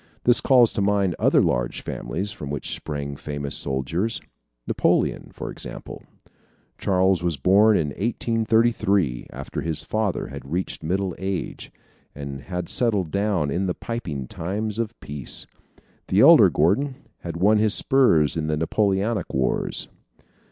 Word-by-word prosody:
This 120 -1 +5
calls 125 -4 +5
to - - -1
mind 100 -3 +1
other - - +4
large - - -1
families 100 +5 -4
from 70 - -7
which 70 -1 -3
sprang 70 -2 -5
famous 70 0 -4
soldiers 75 +11 -1 0.5
Napoleon, - - +1
for - - -6
example. - - -8 0.8
Charles 95 -2 +2
was 85 -4 -1
born 100 +9 +5
in 75 -3 0
1833, 110 - +1
after - - -6
his 80 -2 -2
father 110 +2 -2
had 70 0 -9
reached 90 +2 -2
middle 95 +3 -1
age, 95 -1 -4 0.4
and 70 -1 -6
had 90 +2 -5
settled 105 -9 +1
down 100 -7 0
in 95 +5 -1
the 90 - -1
piping 85 - -5
times 105 - -3
of 115 0 -3
peace. 70 -3 -4 0.6
The - - +3
elder - - +8
Gordon 110 - +1 0.2
had 85 -1 -6
won 105 +4 +4
his 110 0 +2
spurs 125 - +3
in 80 -1 -2
the 75 -1 0
Napoleonic 100 +5 0
Wars. 65 -1 -1
95 Hz, 140 wpm, -24 LUFS, 75-105 Hz, 0.8 s, elder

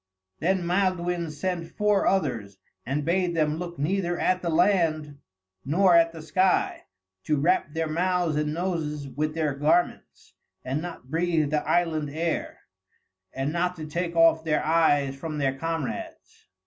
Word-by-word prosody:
Then 180 +1 +1
Maelduin 175 -2 0
sent 165 +2 -4
four 210 -1 +2
others, 110 - -1 0.3
and 140 +2 -1
bade 175 0 +1
them 155 -1 +1
look 175 -1 -6
neither 175 +3 -1
at 185 0 +1
the 170 - -2
land 160 -4 +1 0.4
nor 175 +5 +4
at 165 0 +5
the 165 -1 -10
sky; 185 +4 +1 0.4
to 150 - +1
wrap 155 0 +1
their 165 0 0
mouths 175 0 0
and 150 0 0
noses 155 -4 -3
with 150 +4 -3
their 155 -3 0
garments, 150 +5 -1 0.3
and 135 +4 -2
not 165 -7 -8
breathe 165 -3 +1
the 150 -1 +1
island 160 -4 +1
air; 160 +3 -3 0.7
and 135 +3 -3
not 180 +1 0
to 160 -3 -7
take 170 +2 -3
off 165 -1 +5
their 155 -2 0
eyes 145 -4 +2
from 155 +2 -5
their 135 -2 0
comrades. 165 -1 -5
165 Hz, 150 wpm, -26 LUFS, 150-175 Hz, 0.7 s, at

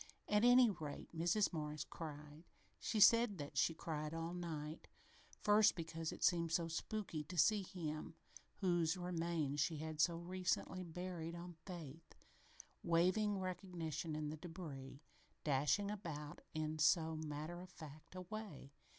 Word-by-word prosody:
At 210 +1 +3
any 245 0 +8
rate, 160 -5 -5
Mrs. 175 +5 +2
Morris 150 -1 -3
cried. 150 -1 -8 0.4
She 220 - -1
said 230 -1 +7
that 145 -2 -6
she 165 - +3
cried 155 -1 -3
all 165 +1 -3
night, 160 -3 -5 0.6
first 210 0 +6
because 165 -1 -3
it - - -6
seemed 170 -2 +3
so 165 0 +2
spooky 165 -1 -3
to 175 +4 -7
see 210 +5 +5
him 165 -5 -5 0.5
whose 175 -2 +2
remains 170 -5 -1
she 155 +2 +1
had 155 0 -2
so 170 0 +3
recently 185 +1 -1
buried 170 -1 -5
on 175 +1 -7
faith, 165 -3 -8 0.7
waiving 185 +5 +3
recognition 175 -4 -3
in 150 -1 -2
the 155 - -5
débris, 155 -6 -7 0.5
dashing 150 +8 +2
about 155 -8 -6
now 155 - 0
in 155 0 -3
so 160 +1 +4
matter 155 +2 -4
of 185 - -10
fact 155 0 -11
a 185 - -4
way. 185 -8 -7
165 Hz, 145 wpm, -40 LUFS, 155-185 Hz, 0.7 s, any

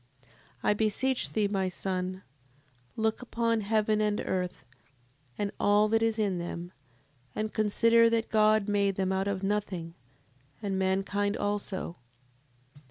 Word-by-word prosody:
7:28. 130 - -29 0.4
I - - +4
beseech 225 +5 0
thee, 215 -2 +2
my 195 -2 0
son, 185 0 -3 0.7
look 220 +1 0
upon 230 -2 0
heaven 215 0 +1
and 210 -1 +1
earth, 180 -6 -3 0.7
and 205 -1 -1
all 205 +1 +4
that 225 +1 +2
is 225 -1 +1
in 200 -5 0
them, 175 0 -5 0.6
and 215 0 -2
consider 230 +2 +4
that 230 -1 0
God 215 -1 +4
made 200 -1 +1
them 190 -1 0
out 190 +1 0
of 195 -1 -2
nothing, 195 -5 -2 0.7
and 195 -2 -2
mankind 195 +2 0
also: 205 -4 -2 0.8
7:29. - - -17
205 Hz, 140 wpm, -29 LUFS, 190-215 Hz, 0.8 s, I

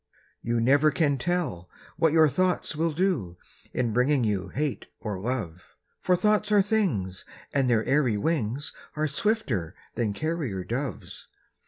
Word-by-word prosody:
You 120 0 0
never 140 +6 +4
can 145 -3 +1
tell 155 - -2 0.3
what 165 -2 +3
your 160 0 +6
thoughts 180 +3 0
will 165 +2 +1
do, 155 - -1 0.3
In 120 -3 -1
bringing 130 +3 +3
you 100 -4 0
hate 145 0 -3
or 105 -4 -4
love; 100 -7 -4 0.3
For 180 - +3
thoughts 210 +2 +2
are 205 -2 +5
things, 140 - 0 0.3
and 135 -3 +2
their 115 -2 +2
airy 135 -6 +2
wings 135 +1 -1 0.2
Are 155 0 0
swifter 140 - -1 0.2
than 110 -4 -1
carrier 145 - -2
doves. 120 +4 -5
140 Hz, 145 wpm, -27 LUFS, 110-165 Hz, 0.3 s, your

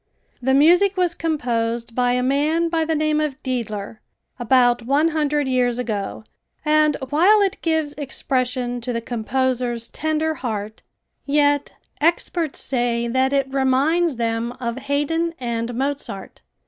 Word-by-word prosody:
The 265 +2 +2
music 355 +7 +5
was 355 -2 +2
composed 235 -8 -2
by 245 0 +2
a 250 0 +1
man 300 +6 +1
by 325 -1 0
the 320 0 0
name 305 0 +1
of 295 -3 -2
Dedler, 220 -5 -4 0.4
about 245 0 +3
one 280 +7 +2
hundred 300 -3 0
years 250 -2 +1
ago, 215 -4 -3 0.4
and 305 -1 +3
while 370 +8 +5
it 390 - -2
gives 320 -3 0
expression 255 -3 -2
to 245 +1 -3
the 230 - -1
composer's 240 0 -2
tender 315 +1 -1
heart, 220 -6 -5 0.5
yet 290 0 +2 0.3
experts 330 0 0
say 240 -2 0
that 260 +2 +1
it 275 -1 0
reminds 275 +5 +2
them 230 0 -2
of 235 -1 -4
Hayden 295 +5 -1
and 235 -1 -2
Mozart. 270 -7 -4
265 Hz, 135 wpm, -21 LUFS, 240-305 Hz, 0.5 s, music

